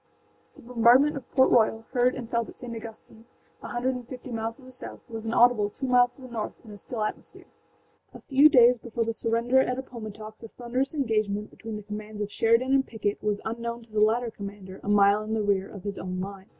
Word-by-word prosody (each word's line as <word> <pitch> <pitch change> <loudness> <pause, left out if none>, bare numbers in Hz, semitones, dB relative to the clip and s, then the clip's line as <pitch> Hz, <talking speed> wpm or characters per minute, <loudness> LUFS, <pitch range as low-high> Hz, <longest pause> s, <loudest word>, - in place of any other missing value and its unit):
The - - -15
bombardment 250 +5 +4
of 275 - -8
Port 260 -1 +4
Royal, 225 -1 +3
heard 250 0 +3
and 245 -3 -6
felt 235 -1 -1
at - - -12
St. 240 -2 -7
Augustine, 225 0 -10 0.4
a - - -7
hundred 245 +2 -1
and 250 -2 -7
fifty 255 0 -9
miles 225 0 -3
to 270 - -18
the 255 - -13
south, 255 - -9
was 225 -2 -6
inaudible 230 -2 +4
two 265 - -6
miles 245 -1 +4
to 265 - -15
the - - -8
north 225 -3 -4
in 215 - -11
a 205 - -11
still 225 0 -4
atmosphere. 215 - -6 0.7
A - - -12
few 280 +2 +6
days 245 -4 +6
before 230 0 -2
the 230 - -1
surrender 230 +3 +2
at 250 -1 +1
Appomattox 215 -4 -8
a 225 - -8
thunderous 250 +5 -3
engagement 215 -6 -1
between 225 -1 -8
the 210 - -7
commands 210 +1 -7
of 205 -1 -3
Sheridan 230 +5 +2
and 270 0 +3
Pickett 205 -2 -3
was 210 -1 -1
unknown 235 +1 -4
to 225 - -22
the 215 - -1
latter 230 +2 +2
commander, 200 -2 -9
a - - -4
mile 205 0 +5
in 215 +1 -3
the 215 - 0
rear 200 -1 +1
of 200 -3 -10
his 200 -1 -4
own 185 0 -4
line. 195 +1 -7
230 Hz, 230 wpm, -27 LUFS, 210-245 Hz, 0.7 s, few